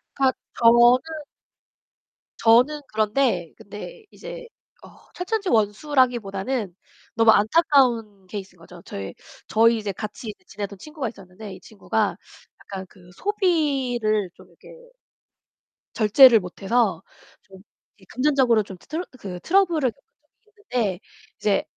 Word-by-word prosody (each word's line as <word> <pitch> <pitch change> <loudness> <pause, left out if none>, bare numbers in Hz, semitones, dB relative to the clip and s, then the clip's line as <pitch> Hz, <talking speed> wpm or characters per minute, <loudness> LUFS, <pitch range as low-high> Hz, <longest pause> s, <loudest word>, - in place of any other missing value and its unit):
그러니까 265 -2 +2 0.2
저는 235 0 +6 1.6
저는 250 +7 +4
그런데 215 - 0
근데 220 - -10
이제 - - -9 0.4
어, - - -13 0.2
철천지원수라기보다는 245 - 0 0.4
너무 225 -1 +6
안타까운 225 - +2
케이스인 195 -2 -8
거죠. 170 +1 -14
저희 95 -1 -7 0.3
저희 230 +1 +4
이제 210 -2 -3
같이 215 +2 -7
지내던 200 0 -6
친구가 300 -6 -5
있었는데 195 0 -11
이 185 - -11
친구가 205 +2 -2 0.5
약간 190 -1 -7
그 180 -1 -19
소비를 270 - 0
좀 - - -17
이렇게 - - -19 1.3
절제를 230 +2 +7
못 180 0 -10
해서 205 -5 +1 0.4
좀 190 -1 -17 0.4
이제 190 - -21
금전적으로 255 -5 +3
좀 190 -2 -11
트 - - -23
트러 320 +5 -3 0.2
그 180 -3 -7
트러블을 335 -9 +2
겪은 275 - -30 0.4
적이 430 - -30 0.2
있는데 205 -7 0 0.4
이제 205 -2 +1
225 Hz, 280 characters per minute, -23 LUFS, 200-275 Hz, 1.6 s, 절제를